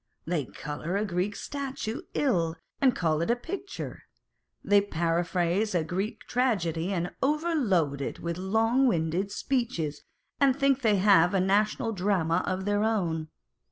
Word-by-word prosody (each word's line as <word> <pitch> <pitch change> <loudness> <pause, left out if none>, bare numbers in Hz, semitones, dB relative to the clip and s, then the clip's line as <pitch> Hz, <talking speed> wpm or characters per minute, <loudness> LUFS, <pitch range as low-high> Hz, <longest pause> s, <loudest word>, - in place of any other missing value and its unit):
They 160 -5 -1
colour 150 +8 -4
a 210 - 0
Greek 190 +2 -1
statue 275 -1 -4
ill, 170 - +1 0.3
and 260 -3 +4
call 160 -2 +1
it 170 - -1
a 235 - +4
picture: 385 +10 -6 0.6
they 205 0 +5
paraphrase 175 +2 0
a 170 - +2
Greek 190 +7 -3
tragedy, 190 -9 0
and 175 -2 -1
overload 265 - +1
it - - -4
with 170 +1 -4
long 225 +7 +2
winded 175 0 0
speeches, 205 - -2 0.4
and 275 -2 +4
think 275 -1 +2
they 220 -4 +3
have 195 -1 +5
a - - +3
national 205 +4 +1
drama 185 -5 +1
of 185 0 -2
their 205 0 +1
own. 170 -8 0
195 Hz, 145 wpm, -28 LUFS, 170-235 Hz, 0.6 s, they